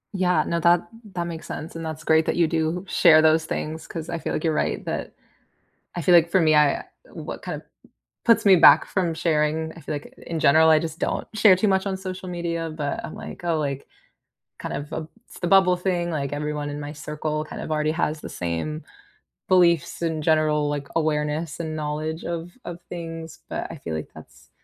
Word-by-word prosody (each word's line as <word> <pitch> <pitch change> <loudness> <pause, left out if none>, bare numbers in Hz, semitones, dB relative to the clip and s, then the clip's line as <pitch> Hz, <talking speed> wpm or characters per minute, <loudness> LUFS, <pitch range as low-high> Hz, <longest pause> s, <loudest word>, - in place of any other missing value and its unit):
Yeah, 180 -5 +2
no, 170 - -1
that 170 +1 +3 0.3
that 175 -1 -2
makes 165 -1 -7
sense, 155 +3 -7
and 165 0 -5
that's 155 0 -6
great 160 0 +3
that - - 0
you 170 -1 +3
do 160 +2 -1
share 160 -3 +6
those 160 0 +4
things, 160 0 -4
'cause 160 -1 -6
I 170 - -2
feel - - -3
like - - -2
you're 160 -2 +1
right - - -1
that - - -4 0.8
I 175 - -2
feel 175 - +4
like 170 -1 +6
for 185 +1 +3
me, 155 -1 +4
I 150 -2 +3 0.3
what - - -7
kind - - -4
of - - -8
m - - -30 0.6
puts 230 -1 +4
me 195 -2 +7
back 155 -2 +8
from 175 -4 -1
sharing, 160 0 0
I - - -10
feel 155 - -5
like 145 - -8
in 165 -1 -3
general, 160 +3 +5
I 155 -1 +6
just 160 0 -5
don't - - -2
share 215 -3 +6
too 190 +4 +1
much 190 0 +1
on 195 -1 -1
social 185 -1 -6
media, 170 -2 -3
but 145 -2 -3
I'm - - -6
like, - - -9
oh, 170 -2 +1
like, 140 -2 -3 0.7
kind - - -5
of, 145 +1 -6
uh 160 - -3 0.2
it's - - -13
the 175 - -1
bubble 185 0 +5
thing, 175 -1 -1
like 140 -4 -2
everyone 150 0 -3
in 145 0 -5
my 145 0 -6
circle 155 0 -3
kind 155 - -8
of - - -5
already 155 0 +1
has 155 -1 -1
the - - -7
same 90 - -3 0.6
beliefs 170 -3 +3
in 160 -2 -1
general, 150 -1 +2
like 145 -1 -3
awareness 155 0 -1
and 160 -2 -4
knowledge 155 +2 -3
of 170 0 -4
of 175 0 -7
things, 165 -2 -7
but - - -3
I 165 - -8
feel 80 - -5
like 80 - -5
that's - - -15
160 Hz, 215 wpm, -24 LUFS, 150-170 Hz, 0.8 s, back